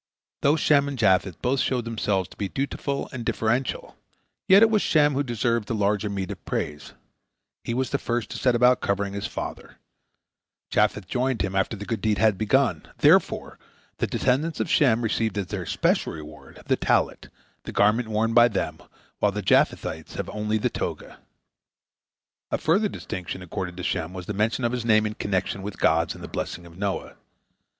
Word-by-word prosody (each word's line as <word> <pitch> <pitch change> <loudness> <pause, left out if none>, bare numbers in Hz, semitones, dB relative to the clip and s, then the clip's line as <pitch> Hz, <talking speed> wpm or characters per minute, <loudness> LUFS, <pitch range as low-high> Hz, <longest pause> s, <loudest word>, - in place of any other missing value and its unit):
Though 145 +2 +4
Shem 145 -2 +3
and 140 -1 -4
Japheth 95 -4 +2
both 130 +2 +1
showed 125 -2 0
themselves 105 -5 -1
to - - -15
be 100 -2 -3
dutiful 140 +2 -3
and 125 -2 -5
deferential, 120 +3 -1 0.5
yet 195 +3 +8
it 225 - +5
was 215 -2 +3
Shem 150 -2 +3
who 135 - +1
deserved 120 -3 -1
the 115 - -2
larger 105 0 +1
meed 95 -2 -3
of - - -9
praise. 75 0 -4 0.7
He 115 - -3
was 130 +1 -1
the 140 - 0
first 120 -1 -2
to - - -5
set 125 -2 +3
about 125 +1 +4
covering 100 0 -1
his 100 - -3
father. - - -7 0.9
Japheth 105 -3 +1
joined 125 +1 0
him 95 0 -3
after 100 +3 0
the 105 - -7
good 115 -3 -3
deed 110 -2 +1
had 110 -1 +4
been 110 - -1
begun. 130 - +2
Therefore - - +3 0.4
the - - +1
descendants 145 +6 0
of - - -1
Shem 120 -5 +4
received 110 -2 0
as 100 - -1
their 95 -4 -4
special - - +1
reward 75 -1 -11
the - - +1
tallit, - - 0 0.4
the - - -5
garment 110 +3 +3
worn 110 +1 0
by 120 0 +7
them, 105 -5 -3 0.4
while 105 - +3
the 105 +1 -4
Japhethites 80 -3 +1
have - - -4
only 105 +1 -1
the 105 - 0
toga. - - -5 1.3
A - - 0
further 200 +7 +2
distinction 90 - -6
accorded 90 0 -5
to 90 - -5
Shem 80 +1 -2
was 90 -1 -7
the 105 - -4
mention 110 +5 0
of 115 - +1
his 125 -2 -2
name 110 -2 +4
in 105 - -2
connection 95 -1 -2
with 100 +1 -6
God's 80 0 +2
in - - -12
the - - -7
blessing 85 - -5
of 85 -1 -14
Noah. 100 +1 -3
110 Hz, 190 wpm, -25 LUFS, 95-125 Hz, 1.3 s, yet